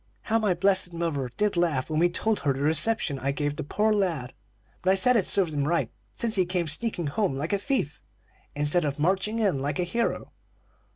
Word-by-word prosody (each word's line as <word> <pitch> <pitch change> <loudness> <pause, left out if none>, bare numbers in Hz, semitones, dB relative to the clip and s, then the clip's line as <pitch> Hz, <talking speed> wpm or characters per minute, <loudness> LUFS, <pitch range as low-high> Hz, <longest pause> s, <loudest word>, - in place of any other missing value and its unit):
How 225 0 +1
my 205 -5 +1
blessed 190 -1 +1
mother 160 -6 -2
did 210 -1 +1
laugh, 165 -7 +1
when 155 -1 -1
we 175 +1 +4
told 215 +5 0
her 140 -1 +1
the 135 - -5
reception 155 0 +2
I 135 - -1
gave 145 +1 -2
the - - -4
poor 215 +9 +1
lad! 170 -11 -1 0.5
But 185 - +1
I 190 - +5
said 250 +6 +3
it 210 - +2
served 180 -6 0
him 145 -1 0
right, 170 +1 0 0.2
since 230 -2 -1
he 185 - +4
came 180 -1 0
sneaking 175 +3 -1
home 185 0 0
like 150 +7 -2
a 200 - +2
thief, 255 - -2 0.5
instead 150 +4 +1
of 145 -2 -2
marching 190 +7 +1
in 195 -12 +1
like 145 +1 -2
a 180 - +1
hero. 230 +7 -2
175 Hz, 215 wpm, -26 LUFS, 145-205 Hz, 0.5 s, I